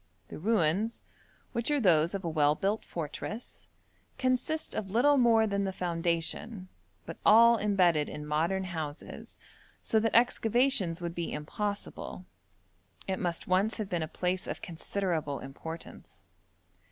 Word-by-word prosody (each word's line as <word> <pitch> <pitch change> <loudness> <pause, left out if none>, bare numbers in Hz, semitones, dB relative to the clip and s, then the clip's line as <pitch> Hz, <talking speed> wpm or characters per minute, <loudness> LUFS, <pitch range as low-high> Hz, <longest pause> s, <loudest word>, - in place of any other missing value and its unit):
The - - -8
ruins, 205 +2 +1 0.5
which 235 +1 -1
are 295 -1 +2
those 170 - +3
of 195 -2 -4
a - - 0
well 150 -2 +3
built 200 +6 -1
fortress, 175 - -6 0.5
consist 260 +5 0
of 200 -3 -3
little 250 +8 +4
more 230 -4 +5
than 200 -1 0
the 195 - -1
foundation, 175 +3 -2 0.4
but 165 - -7
all 230 +2 +7
embedded 180 -7 +2
in 150 - -6
modern 165 +6 0
houses, 160 -5 -6 0.5
so 220 - +2
that 225 0 0
excavations 230 -6 +2
would 170 -1 -3
be 170 -1 -3
impossible. 200 +4 -4 0.8
It 190 -1 -1
must 175 -3 -2
once 195 +4 +2
have 215 -4 -4
been 175 -2 0
a 160 - -2
place 180 +3 -2
of - - -4
considerable 165 -4 -2
importance. 160 +5 -9
190 Hz, 140 wpm, -30 LUFS, 165-220 Hz, 0.8 s, all